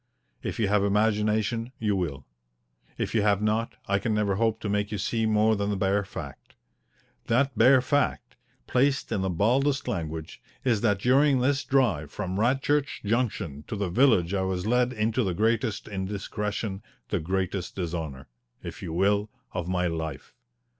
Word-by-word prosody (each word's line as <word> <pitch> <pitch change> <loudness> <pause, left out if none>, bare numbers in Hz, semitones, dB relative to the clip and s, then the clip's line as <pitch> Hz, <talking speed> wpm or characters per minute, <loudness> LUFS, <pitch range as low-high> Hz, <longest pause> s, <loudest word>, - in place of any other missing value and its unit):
If - - -4
you 110 - +2
have 105 0 +2
imagination, 110 +3 +1
you 105 -2 0
will. 75 -8 -3 0.7
If - - -2
you 110 - +3
have 100 -1 +3
not, 110 +2 0
I 100 0 +2
can 110 +1 -1
never 105 -2 +1
hope 110 0 +1
to - - -3
make 105 0 -1
you 105 - -2
see 110 +3 0
more 110 +1 +3
than 100 0 -1
the 100 - -1
bare 100 +1 +1
fact. 70 -7 -9 0.7
That 130 +2 +2
bare 125 +4 +6
fact, 130 -2 0 0.3
placed 135 +1 +1
in 105 -4 0
the 95 - 0
baldest 130 - +1
language, 80 -3 -4 0.2
is 115 -6 +2
that 105 -4 +2
during 135 +5 +4
this 140 +2 +1
drive 105 - +1
from 95 -2 -4
Radchurch 135 +5 +1
Junction 100 - -1
to - - -4
the 100 -3 -2
village 95 -4 +3
I 95 - +1
was 95 0 -2
led 125 +2 +2
into 115 +1 0
the 95 -4 -1
greatest 110 +1 0
indiscretion 100 +1 -3 0.3
the 100 - 0
greatest 95 +2 -2
dishonour, 80 -7 -4 0.4
if - - -7
you 80 - -5
will 100 +4 +2 0.2
of 90 - -4
my 90 0 0
life. 80 -4 -4
105 Hz, 165 wpm, -27 LUFS, 95-115 Hz, 0.7 s, bare